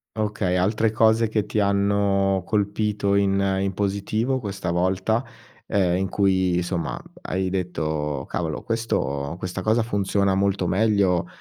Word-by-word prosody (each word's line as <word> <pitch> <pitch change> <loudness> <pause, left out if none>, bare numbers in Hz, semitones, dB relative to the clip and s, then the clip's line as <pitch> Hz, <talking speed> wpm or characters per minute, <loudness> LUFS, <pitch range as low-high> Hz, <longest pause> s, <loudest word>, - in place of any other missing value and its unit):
Okay, 105 -4 0
altre 105 +4 +1
cose 110 0 +3
che 110 -2 0
ti 110 - -1
hanno 100 -1 +2
colpito 105 -1 0
in 100 -1 +2 0.2
in 95 0 -1
positivo 105 +6 -1
questa 100 -4 -4
volta, 95 +6 +1 0.4
ehm, 90 -3 +2
in 95 +1 -1
cui, 95 -3 +2
insomma, 90 - -2 0.2
hai 95 0 -2
detto: 80 -6 -2
“Cavolo, 80 -3 -3
questo 70 - -2
questa 95 +1 -4
cosa 110 +3 +2
funziona 100 -2 +1
molto 100 -2 +1
meglio 100 -3 +2
100 Hz, 130 wpm, -23 LUFS, 90-105 Hz, 0.4 s, cose